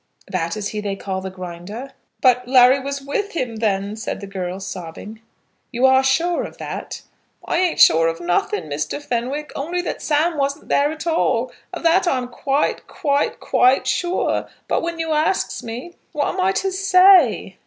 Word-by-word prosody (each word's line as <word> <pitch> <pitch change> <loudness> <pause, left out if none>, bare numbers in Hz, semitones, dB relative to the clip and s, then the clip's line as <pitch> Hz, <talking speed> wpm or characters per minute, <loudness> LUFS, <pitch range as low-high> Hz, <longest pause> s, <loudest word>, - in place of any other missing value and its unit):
"That 170 +1 -2
is 205 -1 -3
he 210 - -4
they 200 -1 -3
call 190 -1 -4
the 190 - -5
Grinder?" 185 +8 -8 0.3
"But 250 -1 +3
Larry 255 +1 +6
was 280 +1 -5
with 400 +9 -3
him 250 -8 -3
then," 205 -1 -1
said 220 - -4
the 200 - -7
girl, 190 -1 -5
sobbing. 190 +3 -8 0.5
"You 245 +2 +2
are 265 0 +5
sure 330 +7 +1
of - - -9
that?" - - -6 0.4
"I 340 - 0
ain't 360 -2 +1
sure 165 +1 +6
of 165 0 -2
nothing, 175 +2 0
Mr. 150 - -3
Fenwick, 280 +2 -3
only 335 +6 -2
that - - -4
Sam 315 +2 +1
wasn't 280 +2 -2
there 285 +1 +2
at 315 +1 -7
all. 330 0 +1 0.2
Of - - -7
that 345 +3 +3
I 270 - +2
am 250 -1 -4
quite, 275 +4 -1
quite, 290 -5 -1
quite 255 +2 +3
sure. 355 +1 0 0.2
But - - +1
when 335 0 -3
you 325 -1 -2
asks 310 +3 0
me, 245 +8 -7 0.2
what 295 -2 0
am 370 - -2
I 375 +1 +3
to 390 0 -1
say?" 365 - +4
265 Hz, 185 wpm, -21 LUFS, 200-320 Hz, 0.5 s, Larry